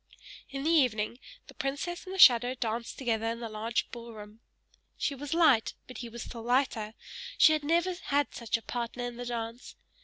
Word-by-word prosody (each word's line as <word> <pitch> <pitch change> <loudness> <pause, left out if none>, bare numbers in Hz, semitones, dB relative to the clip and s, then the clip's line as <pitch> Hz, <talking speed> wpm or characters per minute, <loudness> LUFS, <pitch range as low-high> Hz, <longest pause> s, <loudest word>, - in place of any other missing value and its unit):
In 275 0 -5
the 320 - +2
evening, 245 -7 +2 0.3
the - - -14
princess 285 +6 -3
and 380 - -5
the - - -5
shadow 250 -7 +7
danced 230 -1 -3
together 225 -4 -1
in 230 +1 -2
the 235 - -4
large 220 +2 -2
ball 235 -1 -8
room. 210 +1 -11 0.6
She 285 - -1
was 285 +3 -4
light, 285 -10 +4
but 255 - -10
he 240 - -6
was 235 +1 -7
still 235 - -8
lighter; 230 -3 0 0.4
she 315 - +7
had 305 -1 -1
never 340 +4 +2
had 285 0 +1
such 230 -2 -1
a 225 - -13
partner 240 +2 -4
in 245 -1 -5
the 245 0 -5
dance. 230 0 -5
245 Hz, 195 wpm, -30 LUFS, 230-280 Hz, 0.6 s, shadow